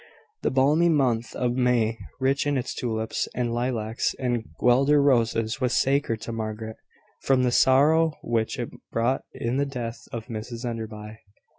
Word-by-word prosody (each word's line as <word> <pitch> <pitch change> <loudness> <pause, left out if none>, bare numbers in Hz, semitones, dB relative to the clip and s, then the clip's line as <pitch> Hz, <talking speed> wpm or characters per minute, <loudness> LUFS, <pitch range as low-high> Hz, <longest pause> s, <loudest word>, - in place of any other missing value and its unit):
The - - +1
balmy 150 +6 +3
month 120 -7 +1
of 125 -1 0
May, 120 -3 +1 0.2
rich 135 +2 +1
in 145 -1 +1
its 125 - -3
tulips, 110 -2 -2
and 120 -1 -1
lilacs, 120 -2 -1
and 120 -3 -2
guelder 135 +4 +4
roses, 115 -4 +2
was 125 0 +1
sacred 135 -5 +1
to - - -5
Margaret, 110 0 -5 0.4
from 130 -1 +2
the 125 - +2
sorrow 150 +6 +4
which 115 +2 -1
it 120 -2 -4 0.2
brought 120 +4 0
in 120 +3 -2
the 140 - +2
death 120 -4 -6
of 115 -2 -5
Mrs 115 +1 -6
Enderby. 110 -2 -6
120 Hz, 155 wpm, -25 LUFS, 115-135 Hz, 0.4 s, guelder